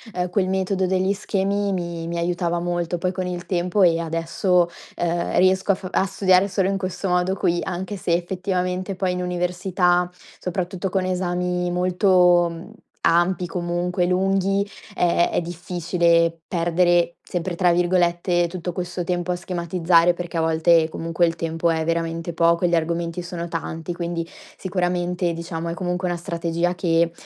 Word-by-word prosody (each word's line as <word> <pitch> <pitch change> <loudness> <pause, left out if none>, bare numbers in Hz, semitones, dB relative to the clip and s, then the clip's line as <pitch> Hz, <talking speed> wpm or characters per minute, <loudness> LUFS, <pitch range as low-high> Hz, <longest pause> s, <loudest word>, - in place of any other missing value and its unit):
ehm, 180 0 -1
quel 185 -2 +1
metodo 190 0 0
degli 190 +1 +1
schemi 200 0 -1
mi 170 -2 -4
mi 170 0 -3
aiutava 175 0 -1
molto. 175 0 -2
Poi 185 +1 -1
con 185 -1 -3
il 180 -1 -5
tempo 180 +1 +1
e 170 -2 +4
adesso, 170 +2 +1 0.3
ehm, 170 0 -1
riesco 190 +2 +4
a - - -2
fa 185 -1 -8
a 190 - +2
studiare 190 0 +3
solo 190 -1 0
in 195 0 -1
questo 185 +1 -3
modo 180 +1 +1
qui. 175 -2 +1
Anche 190 +2 -4
se 175 - -1
effettivamente 180 +1 -1
poi 185 0 0
in 180 - -2
università, 180 0 +1 0.3
soprattutto 180 +1 -3
con 190 0 0
esami 180 -1 -1
molto, 180 -1 +4
mhmm, 170 +4 -9 0.3
ampi, 175 +2 +2
comunque 175 +1 -1
lunghi, 195 +2 +1 0.3
ehm, 175 -1 +3
è - - +1
difficile 170 -1 +1
"perdere", 175 0 +2
sempre 175 0 -4
tra 175 -1 +3
virgolette, 175 0 +2
tutto 180 0 -5
questo 180 0 -4
tempo 175 0 -1
a - - 0
schematizzare, 175 -1 +2
perché 175 -1 -5
a - - +2
volte 160 0 +3
comunque 165 +1 0
il 165 0 -1
tempo 165 0 -1
è 160 -1 +1
veramente 165 +1 -2
poco 170 +1 +3
e 175 - +4
gli 175 - +3
argomenti 170 +1 -1
sono 170 -1 -5
tanti. 165 +1 -4
Quindi, 170 -1 -3 0.3
sicuramente 180 -1 -1
diciamo 165 0 -5
è 170 - -2
comunque 180 +1 -2
una 175 - -1
strategia 170 +1 -1
che 170 -2 +1
175 Hz, 165 wpm, -22 LUFS, 170-185 Hz, 0.3 s, e